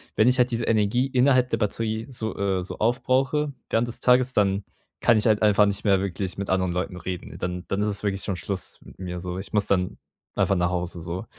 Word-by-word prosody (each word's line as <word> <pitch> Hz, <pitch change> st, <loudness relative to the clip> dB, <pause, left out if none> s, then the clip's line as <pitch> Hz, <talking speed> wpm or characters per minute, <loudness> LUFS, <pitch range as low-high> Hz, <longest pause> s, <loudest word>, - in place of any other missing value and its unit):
wenn 110 Hz, -, +4 dB
ich 125 Hz, +1 st, +4 dB
halt 125 Hz, 0 st, +3 dB
diese 115 Hz, 0 st, -1 dB
Energie 115 Hz, +4 st, +2 dB
innerhalb 130 Hz, -1 st, +3 dB
der 115 Hz, -, +1 dB
Batterie 110 Hz, +1 st, -2 dB
so 110 Hz, -3 st, -4 dB
äh, 95 Hz, -2 st, 0 dB
so -, -, -7 dB
aufbrauche, 135 Hz, +5 st, +1 dB, 0.2 s
während 115 Hz, +2 st, +1 dB
des 120 Hz, -, -4 dB
Tages, 125 Hz, 0 st, +4 dB
dann 100 Hz, -1 st, +2 dB, 0.4 s
kann 115 Hz, -, +5 dB
ich 110 Hz, -, +1 dB
halt 110 Hz, -1 st, +3 dB
einfach 105 Hz, 0 st, +5 dB
nicht 100 Hz, +2 st, -2 dB
mehr 95 Hz, -2 st, +4 dB
wirklich 95 Hz, -1 st, -3 dB
mit 100 Hz, -, -4 dB
anderen 95 Hz, -2 st, +1 dB
Leuten 90 Hz, +1 st, -3 dB
reden. 90 Hz, +1 st, -6 dB
Dann 90 Hz, 0 st, -4 dB
dann 100 Hz, +1 st, -1 dB
ist 105 Hz, -, +1 dB
es 100 Hz, 0 st, -2 dB
wirklich 100 Hz, -1 st, -1 dB
schon 95 Hz, -, -2 dB
Schluss 95 Hz, -1 st, -5 dB
mit -, -, -16 dB
mir 90 Hz, -1 st, -5 dB
so. 90 Hz, 0 st, -4 dB
Ich 100 Hz, -, -8 dB
muss 105 Hz, -2 st, +2 dB
dann 90 Hz, -2 st, 0 dB, 0.4 s
einfach 100 Hz, -, +2 dB
nach 85 Hz, 0 st, +1 dB
Hause 90 Hz, -1 st, -3 dB
so. 90 Hz, +5 st, -5 dB
105 Hz, 230 wpm, -25 LUFS, 95-115 Hz, 0.4 s, kann